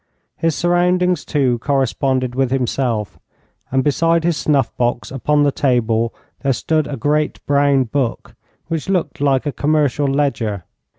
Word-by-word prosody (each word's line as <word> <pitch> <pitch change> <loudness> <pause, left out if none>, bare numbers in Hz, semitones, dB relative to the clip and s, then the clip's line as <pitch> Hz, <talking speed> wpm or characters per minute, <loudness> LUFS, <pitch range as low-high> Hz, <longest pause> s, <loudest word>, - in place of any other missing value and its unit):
His 165 -2 0
surroundings, 180 -1 +2
too, 130 -5 0
corresponded 130 -1 0
with 130 0 0
himself, 125 -4 -1 0.5
and 130 0 +2
beside 165 +3 +2
his 170 -1 +1
snuff 140 -5 0
box 120 0 -1
upon 145 +2 +1
the 145 - +3
table 120 -4 +1 0.3
there 135 -1 +1
stood 155 +3 0
a 140 - -5
great 150 +4 0
brown 140 -1 +3
book, 125 0 -3 0.3
which 165 +1 -4
looked 175 -4 -1
like 135 -1 +2
a 145 - -1
commercial 145 -1 +1
ledger. 135 - -1
140 Hz, 140 wpm, -18 LUFS, 125-150 Hz, 0.5 s, the